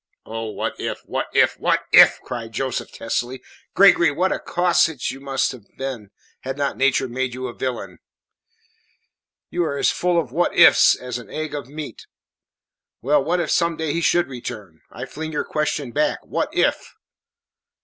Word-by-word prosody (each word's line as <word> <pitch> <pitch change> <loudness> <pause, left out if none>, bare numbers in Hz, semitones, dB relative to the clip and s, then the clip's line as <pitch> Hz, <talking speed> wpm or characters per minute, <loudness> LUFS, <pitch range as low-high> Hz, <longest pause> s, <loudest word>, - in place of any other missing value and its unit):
"Oh, 115 0 -5
what 110 - -4
if - - -4
what - - -3
if - - +3
what - - +1
if!" - - +8
cried 115 -2 -6
Joseph 130 +2 -3
testily. 125 +2 -3 0.3
"Gregory, 185 -4 +6
what 180 +6 0
a - - -1
casuist 170 -6 +1
you 135 - -9
might 135 -1 0
have 120 -5 -12
been 130 -6 -5 0.3
had 135 +1 -5
not 140 -1 -1
nature 135 -1 +2
made 130 0 -3
you 130 0 -5
a 120 - -5
villain! 115 -9 -5 1.5
You 175 - 0
are 140 -4 -2
as - - +2
full 175 -1 +1
of 140 -7 -4
"what 175 +6 0
if - - +9
s" - - +5
as 125 -1 -6
an 120 - -13
egg 155 -1 -5
of 145 -4 -5
meat. 150 +1 -8 1.0
Well 140 +2 +3
what 175 +5 0
if 165 -4 -1
some 170 -1 +1
day 160 -2 -2
he 170 - -1
should 175 +1 +2
return? 110 -9 -8
I - - -7
fling 160 +1 -7
your 150 - -1
question 150 -4 -2
back 150 +4 0
what - - -2
if?" - - 0
135 Hz, 180 wpm, -22 LUFS, 125-160 Hz, 1.5 s, if